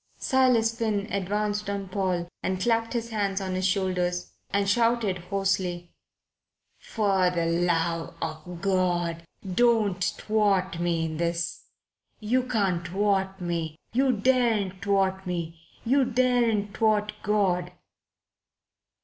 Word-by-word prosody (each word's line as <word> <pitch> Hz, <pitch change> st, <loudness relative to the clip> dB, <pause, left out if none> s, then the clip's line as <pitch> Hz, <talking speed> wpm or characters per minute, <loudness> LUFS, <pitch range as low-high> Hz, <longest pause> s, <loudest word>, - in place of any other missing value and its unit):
Silas 245 Hz, -4 st, +3 dB
Finn 215 Hz, -3 st, -1 dB
advanced 205 Hz, +2 st, -1 dB
on 200 Hz, -1 st, -3 dB
Paul 185 Hz, -2 st, -1 dB
and 190 Hz, 0 st, -1 dB
clapped 230 Hz, +3 st, +1 dB
his 235 Hz, -1 st, -3 dB
hands 200 Hz, -2 st, 0 dB
on 190 Hz, -1 st, -3 dB
his 185 Hz, +1 st, +1 dB
shoulders 180 Hz, -2 st, -1 dB, 0.2 s
and 200 Hz, 0 st, 0 dB
shouted 230 Hz, -3 st, +2 dB
hoarsely: 180 Hz, -2 st, -2 dB, 0.9 s
"For 195 Hz, -4 st, +1 dB
the 170 Hz, -2 st, -1 dB
love 170 Hz, -1 st, 0 dB
of 165 Hz, +2 st, -6 dB
God 175 Hz, -3 st, 0 dB, 0.3 s
don't 215 Hz, -4 st, +3 dB
thwart 195 Hz, -3 st, +1 dB
me 170 Hz, -1 st, 0 dB
in 160 Hz, -1 st, -4 dB
this. 170 Hz, 0 st, -2 dB, 0.5 s
You 235 Hz, +4 st, +1 dB
can't 200 Hz, -9 st, -1 dB
thwart 195 Hz, 0 st, 0 dB
me. 170 Hz, -3 st, -3 dB, 0.2 s
You 265 Hz, +2 st, +3 dB
daren't 220 Hz, -5 st, +1 dB
thwart 190 Hz, -1 st, +1 dB
me. 170 Hz, -2 st, -4 dB, 0.2 s
You 270 Hz, +4 st, +4 dB
daren't 235 Hz, -5 st, +1 dB
thwart 210 Hz, -1 st, +2 dB
God." 185 Hz, -4 st, +1 dB
195 Hz, 115 wpm, -26 LUFS, 180-215 Hz, 0.9 s, You